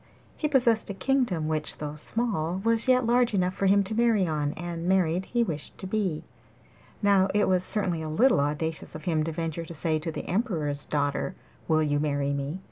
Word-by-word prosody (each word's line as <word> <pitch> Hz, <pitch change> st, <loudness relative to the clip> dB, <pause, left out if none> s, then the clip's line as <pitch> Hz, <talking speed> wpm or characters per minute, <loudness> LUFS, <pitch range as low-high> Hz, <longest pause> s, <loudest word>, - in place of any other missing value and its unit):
He 305 Hz, -, -1 dB
possessed 240 Hz, -7 st, +2 dB
a 200 Hz, -, -4 dB
kingdom 230 Hz, -, 0 dB
which, 155 Hz, -1 st, -1 dB
though 150 Hz, -1 st, -5 dB
small, 180 Hz, 0 st, -1 dB
was 230 Hz, +1 st, +1 dB
yet 255 Hz, -1 st, +4 dB
large 240 Hz, -1 st, +3 dB
enough 185 Hz, -1 st, +1 dB
for 195 Hz, -, 0 dB
him 200 Hz, +1 st, +5 dB
to 200 Hz, +3 st, -5 dB
marry 225 Hz, -4 st, +3 dB
on, 150 Hz, -3 st, -1 dB
and 170 Hz, 0 st, -5 dB
married 185 Hz, -1 st, +2 dB
he 240 Hz, -1 st, +1 dB
wished 155 Hz, -9 st, -4 dB
to -, -, -5 dB
be. 190 Hz, -5 st, -1 dB, 0.8 s
Now 200 Hz, -2 st, +4 dB
it 210 Hz, -, +3 dB
was 185 Hz, -1 st, +2 dB
certainly 185 Hz, -5 st, -1 dB
a 155 Hz, -, -4 dB
little 230 Hz, -, +4 dB
audacious 150 Hz, +3 st, -2 dB
of 155 Hz, -, -8 dB
him 160 Hz, -2 st, +1 dB
to 165 Hz, -, -2 dB
venture 165 Hz, 0 st, -3 dB
to 165 Hz, -, -9 dB
say 155 Hz, 0 st, 0 dB
to 165 Hz, +1 st, -4 dB
the -, -, -6 dB
Emperor's 165 Hz, -, -1 dB
daughter, 145 Hz, +4 st, -1 dB, 0.3 s
'Will 155 Hz, -1 st, +3 dB
you 145 Hz, -1 st, +1 dB
marry 140 Hz, -1 st, 0 dB
me? 140 Hz, +5 st, -3 dB
175 Hz, 205 wpm, -27 LUFS, 155-210 Hz, 0.8 s, him